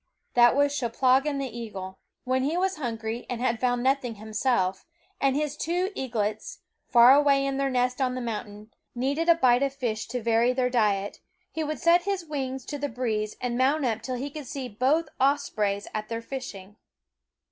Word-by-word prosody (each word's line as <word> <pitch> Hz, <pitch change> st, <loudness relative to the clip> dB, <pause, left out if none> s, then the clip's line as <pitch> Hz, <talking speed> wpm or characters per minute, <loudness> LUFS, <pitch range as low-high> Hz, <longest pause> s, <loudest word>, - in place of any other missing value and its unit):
That 240 Hz, 0 st, +6 dB
was 285 Hz, 0 st, +3 dB
Cheplahgan 265 Hz, +3 st, +2 dB
the 265 Hz, -4 st, -4 dB
eagle. 195 Hz, -5 st, -7 dB, 0.2 s
When 260 Hz, +1 st, 0 dB
he 295 Hz, +6 st, 0 dB
was 375 Hz, +1 st, 0 dB
hungry 230 Hz, -3 st, -4 dB
and 245 Hz, -, -3 dB
had 235 Hz, -2 st, 0 dB
found 245 Hz, 0 st, 0 dB
nothing 260 Hz, -3 st, +1 dB
himself, 215 Hz, -3 st, -1 dB, 0.4 s
and 270 Hz, -1 st, +2 dB
his 295 Hz, 0 st, -1 dB
two 355 Hz, +5 st, -1 dB
eaglets, 220 Hz, -, -3 dB, 0.3 s
far 240 Hz, +1 st, +8 dB
away 280 Hz, -1 st, +4 dB
in 275 Hz, -1 st, -1 dB
their 275 Hz, 0 st, +1 dB
nest 250 Hz, +1 st, 0 dB
on 255 Hz, -1 st, +1 dB
the -, -, -3 dB
mountain, 215 Hz, -2 st, -6 dB, 0.2 s
needed 280 Hz, +7 st, 0 dB
a 335 Hz, -, +8 dB
bite 250 Hz, -5 st, +4 dB
of 275 Hz, -1 st, 0 dB
fish 230 Hz, -5 st, -3 dB
to 250 Hz, +2 st, -3 dB
vary 230 Hz, +2 st, +3 dB
their 250 Hz, -1 st, 0 dB
diet, 205 Hz, -4 st, +1 dB, 0.3 s
he 320 Hz, -, -3 dB
would 305 Hz, 0 st, -3 dB
set 345 Hz, +1 st, +4 dB
his 395 Hz, -3 st, -2 dB
wings 265 Hz, -4 st, -4 dB
to 290 Hz, -, -5 dB
the 285 Hz, 0 st, -2 dB
breeze 220 Hz, -3 st, -2 dB
and 245 Hz, -1 st, -2 dB
mount 275 Hz, +3 st, +2 dB
up 225 Hz, -2 st, -1 dB
till 255 Hz, +3 st, -4 dB
he 275 Hz, +4 st, -4 dB
could 295 Hz, -2 st, -8 dB
see 265 Hz, 0 st, -5 dB
both 265 Hz, +9 st, +1 dB
ospreys 235 Hz, -8 st, +1 dB
at 215 Hz, 0 st, -4 dB
their 230 Hz, 0 st, -4 dB
fishing. 210 Hz, -6 st, -8 dB
255 Hz, 190 wpm, -26 LUFS, 230-280 Hz, 0.4 s, far